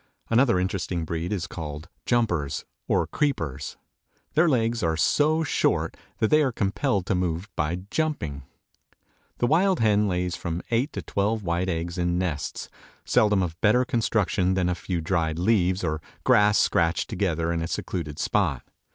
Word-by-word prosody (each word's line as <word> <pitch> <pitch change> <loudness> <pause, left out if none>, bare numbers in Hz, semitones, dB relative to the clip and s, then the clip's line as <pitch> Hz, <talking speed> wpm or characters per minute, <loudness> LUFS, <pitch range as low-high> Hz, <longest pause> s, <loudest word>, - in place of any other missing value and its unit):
Another 115 -5 +4
interesting 90 -2 -2
breed 85 +3 -3
is 95 -5 -1
called 75 -2 -7 0.2
"Jumpers" 90 - 0 0.2
or - - +2
"Creepers." 80 - -2 0.6
Their 160 +2 +4
legs 115 -3 +1
are 80 -3 0
so 155 - +3
short 145 - +1 0.2
that 110 - +1
they 155 - +6
are 135 -3 +2
compelled 100 -1 0
to 100 - 0
move 90 0 -1
by 85 +4 -1
jumping. 140 - -1 1.0
The - - +1
wild 180 +7 +3
hen 105 -1 +3
lays 90 -1 -1
from 85 -1 -4
eight 125 +6 +1
to - - -5
twelve 105 +2 -1
white 90 +1 -1
eggs 85 +1 -3
in 90 0 +1
nests, 80 -6 -3 0.4
seldom 105 -3 +3
of 85 -1 -5
better 125 +4 +4
construction 105 -6 +1
than 90 -1 +1
a - - +1
few 85 0 -3
dried 80 -2 0
leaves 95 -1 +2
or 80 -2 -1 0.2
grass 105 0 +5
scratched 85 0 +2
together 85 -5 -1
in 85 - -1
a 85 - -2
secluded 80 -4 -4
spot. - - 0
90 Hz, 160 wpm, -25 LUFS, 85-115 Hz, 1.0 s, they